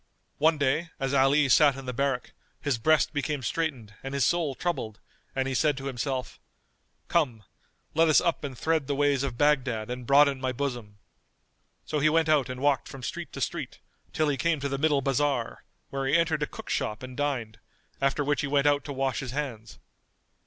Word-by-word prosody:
One 155 +1 +4
day, 145 +4 0
as 135 -1 -1
Ali 140 +2 +4
sat 140 +2 +5
in 135 - -8
the 125 - -4
barrack, 135 0 -1 0.3
his 140 -5 -1
breast 155 +7 +3
became 145 -1 -2
straitened 130 -9 -2
and 135 +1 -5
his 135 -4 +2
soul 165 -6 +1
troubled 115 -12 -3 0.4
and 130 0 0
he 135 - -2
said 145 +1 +2
in 135 - -8
himself, 130 -1 -3 0.7
"Come, 130 -11 0 0.5
let 165 +1 +4
us 155 - +6
up 170 - -1
and 135 -4 -5
thread 160 -2 0
the 140 - -1
ways 145 -1 +2
of 135 -4 -3
Baghdad 125 -6 +1
and 125 -1 -6
broaden 140 -1 +5
my 130 -1 0
bosom." 120 -6 -4 0.9
So 150 - -1
he 155 +2 +4
went 160 0 +2
out 145 -4 +3
and 130 0 -6
walked 140 -1 +2
from 135 -2 -10
street - - -5
to - - -6
street, - - -3 0.3
till 155 - +1
he 145 -2 0
came 165 0 +1
to 140 - -1
the 135 0 -2
middle 150 -2 +2
bazar, 135 -2 -1 0.3
where 135 -1 -2
he 135 - +4
entered 165 -2 +1
a 150 - 0
cook - - -8
shop 105 +3 -2
and 130 0 -8
dined;[FN#226] 130 -7 -2 0.4
after 135 +2 +1
which 145 0 0
he 145 - -2
went 140 0 +2
out 145 -1 +3
to 145 - -5
wash 135 -1 -1
his 130 -2 -5
hands. 120 -7 -5
140 Hz, 200 wpm, -27 LUFS, 130-150 Hz, 0.9 s, us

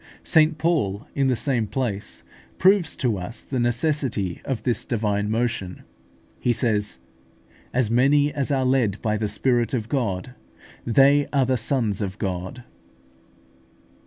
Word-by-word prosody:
St 155 0 +4
Paul, 145 - 0
in 135 -1 +1
the 130 - +2
same 120 -3 0
place, 110 -5 -3 0.3
proves 185 -3 +4
to 115 -7 -1
us 90 +7 -7
the 130 - -3
necessity 120 - 0
of 125 -5 -3
this 120 -2 0
divine 105 -3 -1
motion: 110 -5 -2 0.6
he 120 - +1
says, 105 - -1 0.7
"As 120 -3 +1
many 145 +4 +3
as 140 -1 -2
are 135 -2 +1
led 125 -6 +1
by 110 -1 +1
the 105 0 -1
Spirit 120 +2 +1
of 115 -2 -4
God, 115 -4 -2 0.5
they 140 +4 +4
are 140 -2 +2
the 130 +1 +1
sons 115 -4 0
of 95 -1 -4
God" 95 +5 -4
(Rom. - - -29
120 Hz, 145 wpm, -23 LUFS, 105-135 Hz, 0.7 s, St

